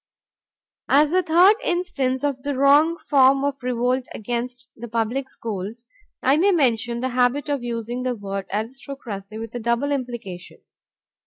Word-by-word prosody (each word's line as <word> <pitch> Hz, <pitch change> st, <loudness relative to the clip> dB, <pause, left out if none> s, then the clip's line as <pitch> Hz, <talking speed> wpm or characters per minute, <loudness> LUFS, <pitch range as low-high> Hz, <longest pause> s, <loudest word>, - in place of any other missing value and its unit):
As 295 Hz, +3 st, +4 dB
a 370 Hz, -, +4 dB
third 360 Hz, +5 st, +5 dB
instance 285 Hz, -8 st, -1 dB
of 280 Hz, -3 st, -1 dB
the 285 Hz, +1 st, -2 dB
wrong 290 Hz, +5 st, +4 dB
form 270 Hz, -2 st, +4 dB
of 280 Hz, -1 st, -2 dB
revolt 250 Hz, +1 st, 0 dB
against 245 Hz, +2 st, -4 dB
the 240 Hz, +1 st, -8 dB
public 235 Hz, +4 st, -2 dB
schools, 220 Hz, +2 st, -6 dB, 0.4 s
I 270 Hz, +3 st, +4 dB
may 375 Hz, +5 st, +4 dB
mention 240 Hz, -, +1 dB
the 260 Hz, -, -1 dB
habit 255 Hz, +3 st, +1 dB
of 285 Hz, -3 st, -1 dB
using 235 Hz, +1 st, -3 dB
the 250 Hz, -1 st, -1 dB
word 195 Hz, -2 st, -5 dB
aristocracy 220 Hz, -2 st, -6 dB
with 225 Hz, 0 st, -7 dB
a 245 Hz, -, -4 dB
double 235 Hz, +5 st, 0 dB
implication. 240 Hz, -10 st, -5 dB
250 Hz, 150 wpm, -23 LUFS, 230-280 Hz, 0.4 s, third